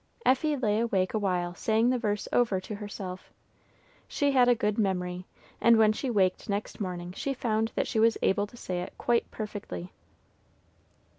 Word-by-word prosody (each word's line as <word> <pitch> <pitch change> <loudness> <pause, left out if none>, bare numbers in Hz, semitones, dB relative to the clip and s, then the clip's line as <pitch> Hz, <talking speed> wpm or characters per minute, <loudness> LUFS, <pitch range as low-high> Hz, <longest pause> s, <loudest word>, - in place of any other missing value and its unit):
Effie 290 +3 +3
lay 215 -4 +1
awake 195 -5 0
awhile 180 -5 0
saying 225 +6 +2
the 255 - 0
verse 210 -3 -1
over 230 -6 +3
to 190 +3 -7
herself. 200 -3 -7 0.8
She 285 -1 +1
had 255 -2 +5
a 245 - +5
good 210 -1 -1
memory, 180 -2 -1 0.3
and 230 -1 +6
when 215 -1 +5
she 260 +4 -3
waked 195 -5 +1
next 200 +1 -3
morning 180 -2 -4
she 275 +8 -3
found 225 -2 0
that - - +1
she 220 - -1
was 225 0 +4
able 205 +2 +2
to 240 - -15
say 180 -5 -3
it 180 - -7
quite 235 -1 +1
perfectly. 200 - -6
210 Hz, 170 wpm, -28 LUFS, 185-235 Hz, 0.8 s, and